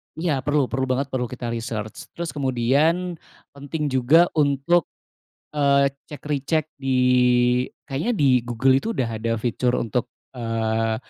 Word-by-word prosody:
Iya, 160 -4 -1
perlu 145 -3 +1
perlu 130 +2 0
banget, 130 +2 0
perlu 125 -2 -1
kita 120 -1 -5
research. 115 -2 -5
Terus 170 -1 -4
kemudian 145 +7 +1 0.3
penting 145 +1 -4
juga 140 +7 +4
untuk, 150 +2 +2 0.7
eee, 140 -1 +3 0.2
check 150 - -10
recheck 150 +2 0
di 135 -2 -1 0.9
kayaknya 150 - -1
di 130 -7 +3
Google 130 +3 +2
itu - - -5
udah 125 - 0
ada 115 +1 -2
fitur 120 +2 0
untuk, 115 +1 -2 0.2
eee, 115 -2 -1
135 Hz, 135 wpm, -23 LUFS, 120-150 Hz, 0.9 s, juga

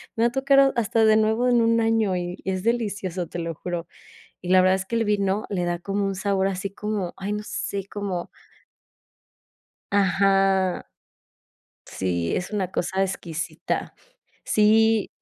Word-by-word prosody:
me 230 - +1
va 235 - +3
tocar 275 +1 +3
ha 275 - +7
hasta 225 -1 +1
de 215 0 +5
nuevo 220 +3 +2
en 240 -1 +4
un 230 0 +3
año 225 -4 +1
y 175 0 -4
y 190 - 0
es 185 0 -3
delicioso, 200 -7 -1
te 175 - -6
lo 165 0 -3
juro. 175 +1 -5 0.6
Y 180 - -7
la 185 0 +7
verdad 185 0 +4
es 190 0 -2
que 230 - -2
el 225 - +1
vino 200 0 0
le 180 -3 -1
da 175 0 -1
como 200 +2 -2
un 195 - -1
sabor 195 0 0
así 195 +1 -3
como, 205 -3 -3
ay, 195 +2 -4
no 210 0 -3
sé, 200 -2 -4
como 195 -4 -4 1.6
ajá, 195 -1 +2 1.0
sí, 85 -3 -2
es 180 - -3
una 190 -3 -2
cosa 190 +2 -1
exquisita. 170 -3 -3 0.5
Sí. 220 0 +3
195 Hz, 165 wpm, -24 LUFS, 185-220 Hz, 1.6 s, ha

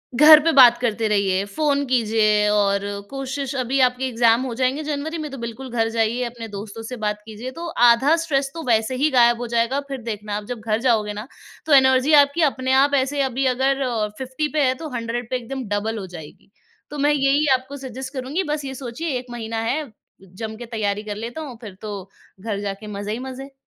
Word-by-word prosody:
घर 300 +4 +9
पे 330 - +3
बात 245 -4 +8
करते 225 -2 -1
रहिए 200 -2 +1
फ़ोन 285 +6 0
कीजिए 215 -4 +2
और 200 -1 +2 0.3
कोशिश 270 0 -4
अभी 260 +1 0
आपके 250 +1 -1
एग्ज़ाम 235 -1 +3
हो 250 - -4
जाएँगे 260 +4 0
जनवरी 305 +2 -3
में 310 -2 -5
तो 275 - -7
बिल्कुल 235 +3 -7
घर 225 -1 0
जाइए 230 +2 0
अपने 235 -1 -6
दोस्तों 210 +2 -8
से 250 +3 -6
बात 210 0 -2
कीजिए। 225 +4 -7
तो 335 +6 -7 0.2
आधा 260 +7 +5
स्ट्रेस 275 -4 0
तो 330 -1 -6
वैसे 225 +1 +2
ही 290 +4 +2
ग़ायब 240 -2 +5
हो 245 - -3
जाएगा। 235 +4 +1
फ़िर 270 -2 -5
देखना 210 -2 -5
आप 210 - -6
जब 245 - -4
घर 215 0 +1
जाओगे 220 -5 +1
ना 210 +3 -7 0.4
तो 310 - +2
एनर्जी 265 +2 +5
आपकी 285 +4 0
अपने 260 0 -3
आप 285 0 0
ऐसे 275 +1 0
अभी 265 0 -1
अगर 270 +2 +1
अ, 235 -5 0
50 265 +4 -3
पे 295 - +4
है 255 - +2
तो 315 - -5
100 235 0 -4
पे 255 - -1
एकदम 260 +2 -6
डबल 215 +2 -1
हो 195 - -5
जाएगी। 170 +1 -12 0.4
तो 295 - -7
मैं 290 +1 +3
यही 280 +1 +2
आपको 260 +2 -3
सजेस्ट 265 0 -7
करूँगी 275 +7 -2
बस 295 -2 -4
ये 265 - -5
सोचिए 265 +6 -5
1 250 - -11
महीना 230 -1 -5
है 310 +3 -1 0.4
जमके 220 +5 -8
तैयारी 210 -3 -2
कर 210 -1 -5
लेता 230 +8 -6
हूँ 270 -6 -8
फ़िर 205 -4 -9
तो 200 -3 -7 0.3
घर 205 -1 -3
जाके 200 +1 -5
मज़े 205 0 -5
ही 230 - -4
मज़े। 265 +1 -8
245 Hz, 215 wpm, -22 LUFS, 220-270 Hz, 0.4 s, घर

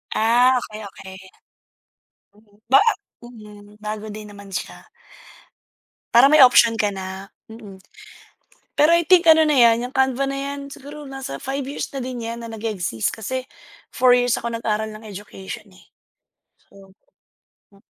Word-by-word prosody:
Ah, 245 +3 +4
okey, 215 0 -9
okey. 190 0 -12 1.2
Mm, 205 0 -26 0.2
ba - - +9 0.4
mm, 215 -4 -13 0.2
bago 215 0 -5
din 215 0 -9
naman 200 -1 -13
siya. - - -6 1.3
Para 245 +4 +7
may 300 -2 +7
option 235 -2 +6
ka 210 -2 0
na, 190 +1 -8 0.2
mm. 215 -4 -12 1.0
Pero 310 +3 +5
I 340 - +2
think 345 +1 +4
ano 320 0 +7
na 300 -3 +2
yan, 235 +1 +4
yung - - -19
canva 265 0 +1
na 275 - -4
yan, 280 0 -6
siguro 290 +3 -10
nasa 270 -1 -7
5 270 0 -4
years 285 - -5
na 275 - -5
din 250 -2 -5
yan 230 +1 -5
na 230 - -8
nag-e-exist 210 - -3
kasi 255 +4 -5 0.5
4 250 -1 +4
years 245 -1 +1
ako 235 0 -5
nag-aral 220 -1 -2
ng 215 +1 -11
education 205 0 -9
eh. - - -19 0.8
So 195 -1 -19 0.8
hmm. 200 - -22
230 Hz, 150 wpm, -21 LUFS, 210-270 Hz, 1.3 s, ba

